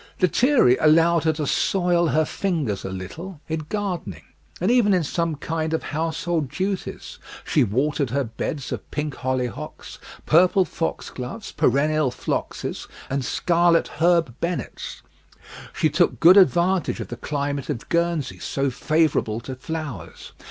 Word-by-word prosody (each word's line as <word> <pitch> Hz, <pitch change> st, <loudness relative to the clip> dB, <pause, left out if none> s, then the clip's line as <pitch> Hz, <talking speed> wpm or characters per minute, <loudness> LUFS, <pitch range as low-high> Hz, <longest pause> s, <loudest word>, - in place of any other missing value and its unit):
Lethierry 185 Hz, -, +4 dB
allowed 165 Hz, +2 st, +4 dB
her 160 Hz, -, +3 dB
to 150 Hz, 0 st, -3 dB
soil 175 Hz, +1 st, +2 dB
her 155 Hz, 0 st, +2 dB
fingers 150 Hz, -, -2 dB
a -, -, -4 dB
little 145 Hz, -, -7 dB
in 155 Hz, -1 st, -4 dB
gardening, 175 Hz, -, -3 dB, 0.4 s
and 185 Hz, +6 st, +2 dB
even 220 Hz, -6 st, +4 dB
in 180 Hz, -, +1 dB
some 165 Hz, +2 st, -1 dB
kind 160 Hz, +2 st, -2 dB
of -, -, -3 dB
household 160 Hz, -1 st, -2 dB
duties: 190 Hz, +5 st, -4 dB, 0.3 s
she 145 Hz, -, +3 dB
watered 135 Hz, +5 st, 0 dB
her 140 Hz, +4 st, 0 dB
beds 135 Hz, +4 st, -5 dB
of -, -, -5 dB
pink 150 Hz, -1 st, -3 dB
hollyhocks, 125 Hz, -1 st, -4 dB, 0.3 s
purple 185 Hz, +4 st, +4 dB
foxgloves, 160 Hz, -, -5 dB
perennial 150 Hz, +2 st, +2 dB
phloxes, -, -, -4 dB, 0.2 s
and 135 Hz, 0 st, 0 dB
scarlet 170 Hz, +3 st, +2 dB
herb 170 Hz, -6 st, +3 dB
bennets. 175 Hz, +1 st, -4 dB, 0.7 s
She -, -, +1 dB
took 175 Hz, +3 st, +2 dB
good 175 Hz, +3 st, +8 dB
advantage 185 Hz, -1 st, +3 dB
of -, -, -6 dB
the -, -, -5 dB
climate 140 Hz, -1 st, -3 dB
of 130 Hz, -6 st, -4 dB
Guernsey, 170 Hz, -, 0 dB
so 135 Hz, +6 st, -1 dB
favourable 155 Hz, -6 st, +1 dB
to 130 Hz, +2 st, -6 dB
flowers. 140 Hz, -, -7 dB
160 Hz, 140 wpm, -23 LUFS, 135-175 Hz, 0.7 s, good